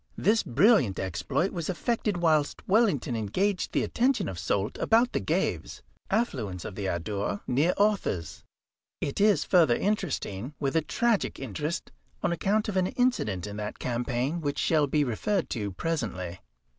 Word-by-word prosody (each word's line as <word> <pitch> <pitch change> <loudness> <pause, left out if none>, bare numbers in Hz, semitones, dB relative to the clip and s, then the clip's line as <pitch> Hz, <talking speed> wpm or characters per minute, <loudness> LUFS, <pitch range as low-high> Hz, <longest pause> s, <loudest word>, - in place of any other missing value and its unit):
This 220 +3 +3
brilliant 145 - +3
exploit 95 - -1
was 170 -2 -4
effected 210 +2 -1
whilst 155 -4 +1
Wellington 190 - +2
engaged 180 - -1
the - - +1
attention 245 -4 +1
of 90 - -5
Soult 100 +4 -1
about 235 +3 +3
the - - +1
Gaves, - - -2 0.3
affluents 115 - -1
of - - -5
the 95 0 -3
Adour, 100 +3 -2
near 145 +8 +2
Orthez. 200 - 0 0.6
It 140 +7 -2
is 210 -1 +4
further 165 -10 +4
interesting, 145 - -2
with 140 +1 -1
a 160 - +4
tragic 230 +7 0
interest, 140 - -4 0.3
on - - +2
account 200 +6 +1
of 200 -3 -2
an 185 -1 +2
incident 190 - 0
in 105 0 -6
that 105 0 -5
campaign 125 +6 -2
which 145 -2 -2
shall 155 -3 +2
be 150 +2 +2
referred 175 - -1
to 105 -4 -2
presently. 95 - -3
150 Hz, 155 wpm, -28 LUFS, -, 0.6 s, is